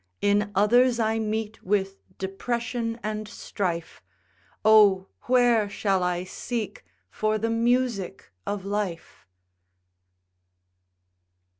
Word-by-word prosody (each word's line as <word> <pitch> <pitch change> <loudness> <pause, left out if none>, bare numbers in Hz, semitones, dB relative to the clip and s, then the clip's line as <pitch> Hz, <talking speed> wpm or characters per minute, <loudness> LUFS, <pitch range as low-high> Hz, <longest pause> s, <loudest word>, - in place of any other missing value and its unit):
In 205 +1 +2
others 240 +5 +4
I 220 0 +1
meet 220 0 -3
with 195 0 0 0.2
depression 230 +4 -3
and 215 0 -3
strife; 175 -5 -4 0.6
Oh! 205 -3 +6 0.2
where 240 -4 +4
shall 200 -1 0
I 180 0 0
seek 215 +3 -5 0.3
for 215 0 0
the 225 +2 -1
music 230 -4 0 0.2
of 205 -2 -3
life? 200 - -4
210 Hz, 95 wpm, -26 LUFS, 195-230 Hz, 0.6 s, Oh